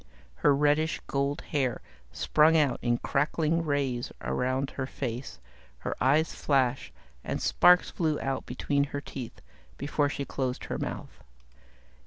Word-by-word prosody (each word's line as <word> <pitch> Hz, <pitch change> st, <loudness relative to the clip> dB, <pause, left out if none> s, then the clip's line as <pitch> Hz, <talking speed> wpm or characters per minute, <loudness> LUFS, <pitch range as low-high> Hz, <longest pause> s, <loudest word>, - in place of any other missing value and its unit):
Her 145 Hz, -1 st, +4 dB
reddish 150 Hz, +2 st, +2 dB
gold 140 Hz, +1 st, -1 dB
hair 130 Hz, -5 st, -1 dB, 0.3 s
sprang 160 Hz, +1 st, +4 dB
out 145 Hz, -5 st, +2 dB
in 120 Hz, -1 st, +1 dB
crackling 155 Hz, +5 st, 0 dB
rays 140 Hz, -5 st, -1 dB
around 130 Hz, -, -1 dB
her 130 Hz, -2 st, -4 dB
face, 125 Hz, -1 st, -5 dB, 0.4 s
her -, -, -4 dB
eyes 150 Hz, +4 st, +3 dB
flashed 130 Hz, -4 st, +1 dB, 0.3 s
and -, -, -3 dB
sparks 180 Hz, 0 st, +5 dB
flew 155 Hz, -3 st, 0 dB
out 135 Hz, -1 st, -3 dB
between 140 Hz, +3 st, 0 dB
her 145 Hz, 0 st, -5 dB
teeth 130 Hz, -4 st, -8 dB, 0.4 s
before 145 Hz, 0 st, 0 dB
she 140 Hz, 0 st, -4 dB
closed 130 Hz, -2 st, -3 dB
her -, -, -4 dB
mouth. -, -, -6 dB
140 Hz, 135 wpm, -28 LUFS, 130-150 Hz, 0.4 s, sparks